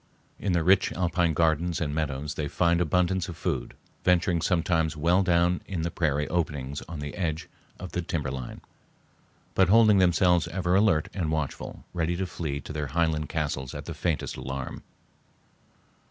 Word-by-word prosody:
In 100 - 0
the 85 -1 +2
rich 95 +3 +4
alpine 85 -2 +1
gardens 80 +1 +1
and 75 -3 -2
meadows 75 -1 -2
they 75 0 -3
find 85 +3 +2
abundance 90 +2 +1
of 85 - -7
food, - - -3 0.3
venturing 85 -1 +2
sometimes 80 -3 +1
well 85 +5 +3
down 90 -1 +2
in 90 -5 -3
the 85 - -2
prairie 75 -3 0
openings 75 -5 -2
on 80 -3 -6
the 75 0 -5
edge 80 -4 -2 0.3
of 90 -1 -7
the 90 - -2
timberline, 70 -7 -4 0.9
but 95 -2 +4
holding 110 -1 +6
themselves 90 -1 +4
ever 90 +1 -1
alert 95 -6 +3
and 85 -5 -1
watchful, 75 -3 -4
ready 85 -1 0
to 95 +2 -1
flee 75 -5 -4
to 75 - -8
their 75 -1 -2
highland 80 0 0
castles 70 -4 -3
at - - -6
the - - -5
faintest 85 -4 -2
alarm. 65 0 -5
85 Hz, 165 wpm, -27 LUFS, 75-90 Hz, 0.9 s, holding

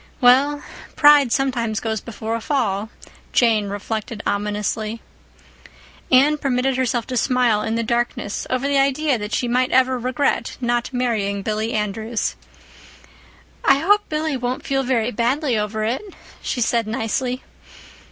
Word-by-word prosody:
Well, 280 +3 +4 0.3
pride 290 -4 +6
sometimes 235 -5 0
goes 220 -2 -3
before 225 -1 -5
a 230 - -2
fall, 220 -6 -1 0.4
Jane 220 -4 +3
reflected 210 +2 -4
ominously. 210 +2 -2 1.1
Anne 285 +4 +5
permitted 265 -1 0
herself 245 -2 0
to 255 - -5
smile 245 -4 +2
in 220 - -2
the 230 - 0
darkness 235 -3 -2
over 255 +2 0
the 280 -1 +2
idea 275 -1 +1
that 210 +1 -5
she 245 - 0
might 250 +1 +1
ever 260 0 +3
regret 250 -1 -1
not 240 0 -1
marrying 215 -6 -1
Billy 220 +2 -2
Andrews. 215 +2 -2 1.3
"I 275 - +5
hope 410 +8 +2
Billy 310 -1 -1
won't 250 0 -3
feel 270 0 +1
very 245 -3 0
badly 250 +4 0
over 215 0 -2
it," 230 +4 -1 0.4
she 245 - -2
said 230 -1 +1
nicely. 245 +3 -2
240 Hz, 140 wpm, -21 LUFS, 220-265 Hz, 1.3 s, pride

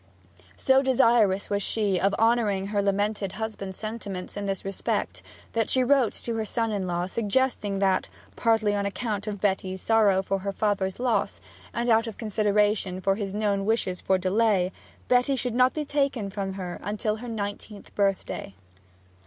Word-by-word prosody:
So 265 0 +4
desirous 230 -7 +3
was 200 0 +1
she 205 -3 0
of 195 +2 +2
honouring 215 -4 +2
her 205 - +2
lamented 200 0 0
husband's 210 -3 -5
sentiments 210 -4 -6
in 205 0 -3
this 195 -1 -3
respect, 195 -1 -2 0.3
that 225 -2 0
she 260 - +4
wrote 255 -3 +3
to 235 - -3
her 220 - 0
son 225 +1 -1
in 195 -3 -2
law 175 0 -1
suggesting 210 0 0
that, 195 -1 +1 0.3
partly 220 -3 +2
on 200 0 0
account 210 0 -3
of 205 -1 -4
Betty's 190 -1 -1
sorrow 205 -3 +3
for 195 +1 -1
her 200 +1 -3
father's 195 -1 -1
loss, 235 - 0 0.3
and 235 +2 -2
out 230 0 +4
of 220 - -7
consideration 210 -3 +1
for 195 +1 +2
his 200 -1 -4
known 205 -2 0
wishes 200 -4 0
for 190 - +2
delay, 190 0 +2 0.4
Betty 250 +2 +3
should 250 -2 -2
not 255 +1 +4
be 305 -1 -3
taken 275 -8 -1
from 195 -1 -3
her 185 -2 -6 0.2
till 215 0 -1
her 245 +2 -8
nineteenth 205 -1 -6
birthday. 195 - -1
205 Hz, 170 wpm, -26 LUFS, 195-225 Hz, 0.4 s, So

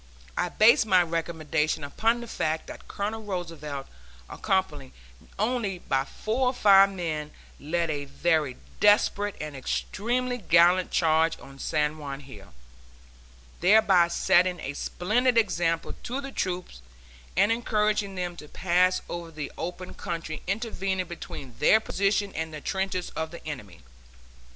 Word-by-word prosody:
I - - 0
based 220 0 +5
my 185 -3 +5
recommendation 160 -2 -1
upon 225 +11 0
the 235 - -8
fact 160 -7 -2
that - - -11
Colonel 215 +2 -3
Roosevelt, 165 -8 -5 0.4
accompanied 155 -9 -2 0.4
only 215 -3 -1
by 135 -5 -1
four 235 - -1
or 250 - +1
five 195 -3 +7
men, 160 -5 -3 0.3
led 165 +2 -1
a 145 -1 -3
very 150 -2 0 0.2
desperate 205 0 +3
and 150 -2 -6
extremely 245 - -2
gallant 175 -1 +4
charge 160 0 +2
on 135 0 -13
San 150 0 -1
Juan 140 -1 -6
Hill, 105 -8 -13 1.1
thereby 190 -2 +5
setting 180 0 +3
a 135 - -4
splendid 230 - 0
example 170 -7 +1
to 255 +3 -4
the 275 -1 -6
troops 180 - -4 0.6
and 205 - +4
encouraging 210 -3 0
them 180 -1 -3
to 150 - -10
pass 180 +2 +2
over 170 -1 -6
the 155 -3 -6
open 180 +1 -6
country 165 -2 -5
intervening 195 -3 -2
between 150 -6 -8
their 215 +8 +6
position 200 -1 0
and 160 0 -3
the 155 - -7
trenches 190 +2 -2
of 160 0 -3
the 170 - -11
enemy. 105 - -7
175 Hz, 135 wpm, -27 LUFS, 155-205 Hz, 1.1 s, five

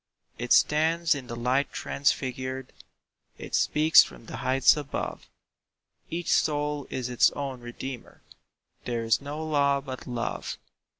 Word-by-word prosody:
It 120 0 -5
stands 165 +2 +4
in 135 -4 -6
the 120 - -5
light 125 +4 0
transfigured, 130 -2 -2 0.6
It - - -10
speaks 155 +2 +6
from - - -12
the - - -7
heights 130 +1 +4
above, 145 -2 -5 0.8
"Each 170 0 -3
soul 150 -1 +1
is 125 -2 -3
its 125 -1 +4
own 135 -3 -4
redeemer; 120 +1 -8 0.6
There 120 -2 -2
is 115 +3 +2
no 150 +3 -5
law 140 -2 +2
but 130 -2 -8
Love." 120 -2 -4
135 Hz, 130 wpm, -27 LUFS, 125-150 Hz, 0.8 s, speaks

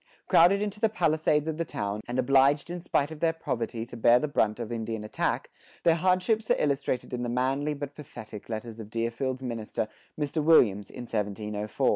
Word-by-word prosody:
Crowded 195 +5 +5
into 210 0 -4
the 225 - +3
palisades 155 -5 +1
of 160 -1 -2
the 170 - 0
town, 105 -8 -3
and 120 - -3
obliged 135 +4 +3
in 175 0 -5
spite 150 -4 0
of 160 - -8
their 165 0 +2
poverty 115 -7 -3
to 120 - -10
bear 120 +1 +5
the 150 - 0
brunt 110 -6 +1
of 120 -1 -5
Indian 110 -2 -3
attack, 105 - -2 0.3
their 165 - +5
hardships 185 +6 +1
are - - +4
illustrated 140 -3 -1
in 125 - -2
the 120 - -2
manly 135 +5 0
but 145 0 -6
pathetic 110 -8 -10
letters 115 0 -5
of 110 -2 -8
Deerfield's 120 +3 -2
minister, 115 -3 -3 0.3
Mr. 150 +1 -1
Williams,[70:3] 105 -11 +4
in - - -5
1704. 105 -1 -1
130 Hz, 190 wpm, -28 LUFS, 115-155 Hz, 0.3 s, Crowded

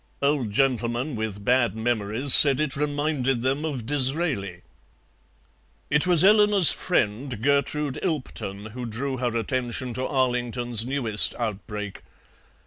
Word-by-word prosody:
Old 140 -5 0
gentlemen 120 +3 -1
with 105 -2 -6
bad 125 -2 +1
memories 115 +3 +2
said 140 -2 +7
it 150 -3 -2
reminded 145 -3 -2
them 135 +4 -2
of 140 -8 -5
Disraeli. 130 - -1 1.3
It 150 +4 +1
was 175 -2 +4
Eleanor's 205 -3 +7
friend, 125 - -2
Gertrude 140 +2 -1
Ilpton, 110 - -5
who 125 +1 -7
drew 130 +4 -4
her 120 -2 -2
attention 125 +1 -3
to 130 +2 -4
Arlington's 120 -3 -2
newest 120 -6 0
outbreak. 105 -2 -6
125 Hz, 120 wpm, -23 LUFS, 115-145 Hz, 1.3 s, said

